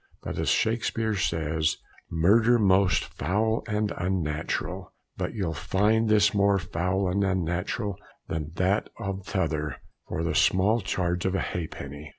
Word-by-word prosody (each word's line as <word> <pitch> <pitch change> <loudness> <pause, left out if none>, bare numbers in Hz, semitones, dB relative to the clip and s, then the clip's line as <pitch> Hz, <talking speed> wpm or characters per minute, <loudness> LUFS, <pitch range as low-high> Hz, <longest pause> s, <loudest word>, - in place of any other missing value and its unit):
But - - -4
as - - 0
Shakspeare 115 -1 +1
says, 80 -4 0 0.3
'Murder 110 +9 +4
most 95 -3 +3
foul 110 +8 -1
and 105 -1 -1
unnatural,' 85 -4 -2 0.2
but - - -3
you'll 95 -6 -1
find 105 +10 +1
this 105 0 +4
more 100 -1 +3
foul 90 +1 -1
and 100 +3 +1
unnatural 95 +2 -1 0.3
than 75 -2 -3
that 95 +4 +1
or 100 0 -3
the 100 - -11
t'other 80 -6 -1 0.3
for 80 - -3
the 85 - 0
small 105 +5 +3
charge 90 -2 -1
of 95 - 0
a - - +1
ha'penny! 75 -3 -5
95 Hz, 145 wpm, -27 LUFS, 85-105 Hz, 0.3 s, Murder